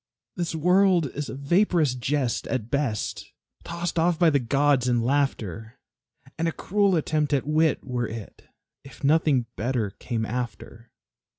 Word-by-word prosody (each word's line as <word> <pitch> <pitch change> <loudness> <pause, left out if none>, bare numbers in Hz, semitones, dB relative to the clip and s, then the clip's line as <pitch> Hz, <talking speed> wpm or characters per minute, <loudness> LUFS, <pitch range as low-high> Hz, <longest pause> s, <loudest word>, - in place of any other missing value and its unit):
This 170 -2 -3
world 180 -2 +3
is 145 0 -4
a - - -6
vaporous 160 0 +2
jest 130 0 -1
at 120 -4 -3
best, 140 -7 -2 0.3
Tossed 170 0 -3
off 170 0 +2
by 170 -2 +4
the 140 - +3
gods 135 +1 +2
in 120 -2 +2
laughter; 115 - -1 0.6
And 165 - +1
a - - +1
cruel 200 +2 +1
attempt 150 -2 0
at 135 -2 +1
wit 155 +1 +2
were 125 -2 -2
it, 110 -2 -9 0.4
If 135 +3 -14
nothing 145 -4 +3
better 115 -3 -1
came 115 +2 -4
after. 115 0 -6
140 Hz, 150 wpm, -25 LUFS, 120-165 Hz, 0.6 s, by